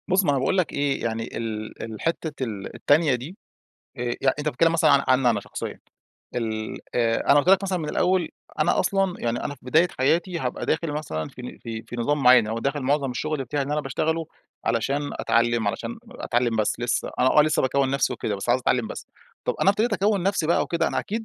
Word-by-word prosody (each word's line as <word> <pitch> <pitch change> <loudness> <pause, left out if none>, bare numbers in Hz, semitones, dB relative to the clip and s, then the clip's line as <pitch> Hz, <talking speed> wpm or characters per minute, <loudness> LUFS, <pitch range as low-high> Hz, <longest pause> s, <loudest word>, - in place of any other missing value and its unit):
بُص، 190 +1 +3
ما 175 - +1
أنا 140 - +1
باقول 135 +8 +1
لك 180 - +1
إيه، 140 -1 0
يعني 115 0 -2
ال 110 -1 -5
ال 110 -2 -7
حتة 160 -4 -2
ال 105 -5 -5
التانية 145 -2 +3
دي، 140 +11 -8 0.6
آآ، 120 - -4 0.2
يعني 135 -1 +2
أنت 150 +1 -1
بتتكلم 165 +4 +2
مثلًا 165 -2 +4
عن 140 -1 +5
عني 130 -1 +4
أنا 105 -3 0
شخصيًا، - - -6 0.6
ال 110 -2 -3 0.2
آآ 115 -1 +1
أنا 145 - +6
قُلت 145 - +1
لك 195 +1 +6
مثلًا 190 -2 -1
من 155 -3 -4
الأول، 180 +2 +1 0.3
أنا - - +3
أصلًا 195 -2 +1
يعني 120 0 -1
أنا 145 - -3
في 130 - -25
بداية 160 +7 +4
حياتي 170 +7 +1
هابقى 125 -5 -3
داخل 160 -1 0
مثلًا 130 - -4
في 125 - -12
ن 125 - -8
في 115 -2 -6
في 120 - -7
نظام 145 +5 0
معين 125 -3 +7
أو 110 +1 -2
داخل 140 +4 -2
معظم 140 0 +1
الشغل 150 +2 -2
بتاعي 145 +3 -2
إن 140 +2 -3
أنا 150 - +1
باشتغله 160 +4 -1 0.4
علشان 135 +6 0
أتعلم، 115 -2 +1
علشان 220 - -4
أتعلم 120 - -1
بس 110 +1 0
لسه، 120 0 -1
أنا 130 +4 +4
آه، - - +9
لسه 155 0 +1
باكوّن 135 +1 +1
نفسي 140 0 +1
وكده، 105 - -3
بس 95 - -6
عايز 120 +2 +3
أتعلم 125 -2 +1
بس. - - -7 0.4
طب، - - 0
أنا 195 - +6
ابتديت 215 +3 0
أكوّن 205 -1 +1
نفسي 195 -4 +1
بقى 170 - +3
وكده، 165 -1 0
أنا - - -2
أكيد 225 +2 -3
140 Hz, 225 wpm, -24 LUFS, 120-165 Hz, 0.6 s, آه